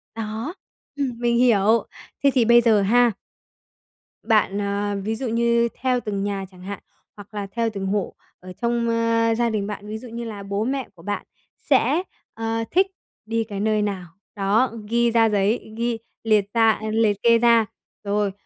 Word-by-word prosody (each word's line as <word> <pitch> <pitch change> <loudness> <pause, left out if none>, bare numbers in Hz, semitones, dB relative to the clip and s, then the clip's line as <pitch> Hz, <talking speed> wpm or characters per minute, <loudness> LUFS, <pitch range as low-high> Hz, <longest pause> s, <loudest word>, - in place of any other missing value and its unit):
Đó, 225 +7 -4 0.4
ừm, 280 -2 0
mình 240 -1 +2
hiểu. 230 -2 +4 0.4
Thế 280 - +6
thì, 245 -3 +3
bây 235 +1 +6
giờ 225 -3 +4
ha 240 +4 +4 1.1
bạn 210 -3 +2
ờ, 205 0 -1
ví 220 +1 -1
dụ 255 +3 -4
như 235 +1 +2
theo 255 -1 +2
từng 205 -4 -3
nhà 200 -1 -2
chẳng 180 -1 -16
hạn, 200 +2 -6 0.4
hoặc 205 0 -13
là 205 -1 -4
theo 230 +1 0
từng 200 -3 -5
hộ 200 0 -1 0.3
ở 185 0 -10
trong, 235 +3 -1
ơ, 230 0 +2
gia 235 0 +1
đình 210 -3 -2
bạn, 205 0 -6
ví 215 +1 -4
dụ 245 - -10
như 235 +1 -6
là 210 -3 -6
bố 200 +1 -2
mẹ 265 +2 -2
của 165 - -16
bạn 205 +2 -3 0.3
sẽ, 280 +5 +2 0.3
ờ, 225 0 -2
thích 380 +3 +4 0.4
đi 225 +1 0
cái 205 -3 -6
nơi 215 +1 +1
nào, 200 -3 -2 0.3
đó, 210 +5 +2 0.2
ghi 235 0 +2
ra 225 -1 +4
giấy, 210 +2 0
ghi 235 0 -1 0.3
liệt 215 -3 +3
ra 225 -1 +4
liệt 220 -2 +2
kê 235 0 +6
ra. 230 -1 +4 0.4
Rồi, 205 0 0
225 Hz, 180 wpm, -23 LUFS, 205-235 Hz, 1.1 s, Thế